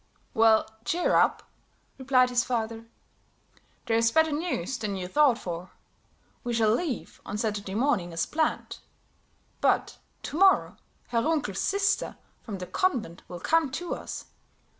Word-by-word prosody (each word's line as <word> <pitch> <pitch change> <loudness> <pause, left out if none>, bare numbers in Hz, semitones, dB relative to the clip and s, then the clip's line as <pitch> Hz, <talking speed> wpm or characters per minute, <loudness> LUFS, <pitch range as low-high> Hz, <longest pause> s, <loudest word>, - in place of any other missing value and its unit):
"Well, 220 -1 +5 0.2
cheer 345 +8 +1
up," - - +3 0.6
replied 255 -1 +3
his 245 -1 +3
father, 230 -2 -3 1.0
"there's 230 0 +3
better 320 +2 +3
news 290 - -2
than 205 -2 -2
you 185 -1 -4
thought 275 +3 +4
for. 175 -2 -6 0.7
We 240 -2 -2
shall 220 -1 +3
leave 275 -1 -3
on 205 - -5
Saturday 205 -3 -2
morning 215 -8 +1
as 165 -1 -1
planned; 315 0 -1 0.8
but - - +1 0.2
to 300 - -4
morrow 385 -1 +4 0.3
Herr 230 -1 +1
Runkel's 290 - 0
sister 395 0 0 0.2
from 210 -4 -6
the 180 - -6
convent 230 - -1
will 175 - -7
come 325 -3 +2
to 350 +5 -3
us. - - -6
235 Hz, 140 wpm, -27 LUFS, 210-300 Hz, 1.0 s, Well